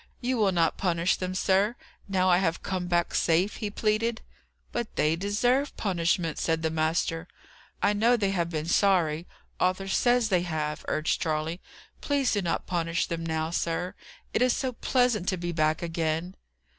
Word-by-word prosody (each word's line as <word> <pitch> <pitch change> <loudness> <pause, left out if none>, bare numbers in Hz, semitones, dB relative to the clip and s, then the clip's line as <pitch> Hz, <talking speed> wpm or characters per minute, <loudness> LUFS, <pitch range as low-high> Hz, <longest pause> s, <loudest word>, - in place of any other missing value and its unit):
"You 255 +1 -1
will 205 -3 +3
not 165 -3 +1
punish 175 -1 +1
them, 185 0 -3
sir, 195 +4 +2 0.3
now 185 -1 +1
I 180 -1 +5
have 165 -3 -1
come 185 -2 -2
back 175 -1 +1
safe?" 175 +5 +2
he 210 - -3
pleaded. 220 +2 0 0.5
"But 235 -2 -4
they 155 +2 +2
deserve 245 +9 0
punishment," 170 -4 0
said 165 -1 0
the 160 - +1
master. 165 +1 0 0.6
"I 205 - +4
know 230 +4 +3
they 200 -3 0
have 170 -3 0
been 155 -2 -3
sorry; 170 -3 +2 0.3
Arthur 185 +1 +1
says 240 +3 +2
they 180 -3 +3
have," 155 -3 -3
urged 155 - 0
Charley. 160 +2 -2 0.4
"Please 280 -3 +1
do 205 - +1
not 170 -3 -1
punish 170 -1 0
them 165 -1 -4
now, 160 0 -2
sir; 175 +1 -1 0.4
it - - +1
is 250 -1 +4
so 260 - -1
pleasant 245 -5 +1
to 185 - -1
be 175 0 -3
back 155 0 +1
again!" 165 +2 -2
180 Hz, 170 wpm, -27 LUFS, 165-205 Hz, 0.6 s, I